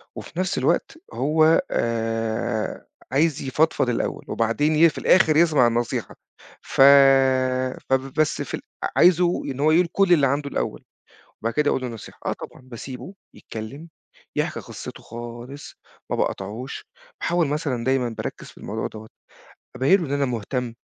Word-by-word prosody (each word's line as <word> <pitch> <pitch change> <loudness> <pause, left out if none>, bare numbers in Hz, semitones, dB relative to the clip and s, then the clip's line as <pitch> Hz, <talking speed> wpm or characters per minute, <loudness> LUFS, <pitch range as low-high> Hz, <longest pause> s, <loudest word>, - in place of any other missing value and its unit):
وفي 170 - -8
نفس 185 -1 -1
الوقت - - 0 0.2
هو 155 +2 +3
آآ، 115 -1 -2 0.2
عايز 150 +2 +2
يفضفِض 135 -1 +1
الأوَّل، 120 - -2
وبعدين 130 +7 +1
ي 165 +2 +6
في 150 - -11
الآخر 160 -4 +4
يسمع 155 -7 +5
النصيحة. 120 0 -2 0.5
ف - - -1 1.1
فبس 135 +3 0
في - - -6
ال - - -3 0.4
عايزه 175 0 +4
إن 135 -1 -5
هو 155 +2 +3
يقول 170 +2 +4
كل 195 -2 +4
اللي 145 -5 +4
عنده 140 +2 -1
الأوَّل، - - -3 0.6
وبعد 115 +1 -1
كده 150 -1 +2
أقول 130 - 0
له 125 - -3
النصيحة. 115 -3 -10
آه، - - 0
طبعًا، - - -11
باسيبه 130 - -9 0.2
يتكلَّم، 130 +9 -8 0.5
يحكي - - -1
قصَّته - - -9
خالص، 120 +4 -9 0.3
ما - - 0
باقاطعوش. 110 +8 -4 0.3
باحاول 170 -2 +1
مثلًا 140 -5 -2
دايمًا 130 -1 +1
بأركِّز 115 - -6
في - - -16
الموضوع - - -4
دوَّة، 110 0 -11 0.7
أبيِّن 145 +10 +4
له 165 - -3
إن 135 - -5
أنا 140 0 +1
مهتم. 120 0 -3
135 Hz, 150 wpm, -23 LUFS, 120-155 Hz, 1.1 s, ي